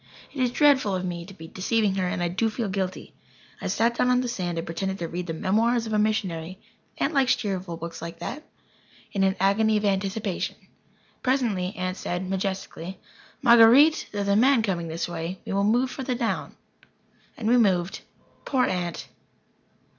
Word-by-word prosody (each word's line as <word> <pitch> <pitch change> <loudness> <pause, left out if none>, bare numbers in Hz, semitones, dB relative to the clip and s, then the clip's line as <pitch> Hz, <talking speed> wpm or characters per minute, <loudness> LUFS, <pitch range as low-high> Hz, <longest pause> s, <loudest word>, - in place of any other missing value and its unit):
It 275 - -3
is 250 - +3
dreadful 265 -6 +3
of 185 0 -2
me 170 -1 -5
to 195 - -11
be 160 -3 -10
deceiving 205 +3 0
her 190 -1 0
and 180 0 -2
I - - +1
do 190 +6 0
feel 220 -1 -3
guilty. 190 -1 -3 0.5
I - - -3
sat 235 +1 +1
down 250 - +3
on 250 0 +3
the 250 - -2
sand 180 -7 -3
and 165 - -3
pretended 190 +3 -3
to 170 - -4
read 175 +2 -5
the 165 - -3
"Memoirs 225 +7 +1
of 220 - -4
a 210 - +3
Missionary" 185 -5 -1 0.4
Aunt 300 - 0
likes 270 -2 +4
cheerful 190 -5 -4
books 170 0 -7
like 165 0 -7
that 275 - -5 0.7
in 195 -2 0
an 190 0 +2
agony 215 +3 +3
of 210 - -1
anticipation. 195 0 -1 0.7
Presently 225 -8 0
Aunt 185 -1 -3
said, 180 +1 -3
majestically: 190 -1 -4 0.5
"Marguer_ite_, 240 +7 +7
there 205 - -3
is - - -4
a 200 - +3
man 250 +1 +4
coming 175 -5 -1
this 165 +1 -3
way. 170 +2 -4
We - - -4
will 200 0 +2
move 245 +5 +2
further 260 -2 -3
down." 235 -2 -2 0.8
And 220 - -3
we 245 +2 +5
moved. 190 -5 +2 0.4
Poor 260 -3 +2
Aunt! 175 -2 -3
195 Hz, 185 wpm, -25 LUFS, 180-230 Hz, 0.8 s, Marguer_ite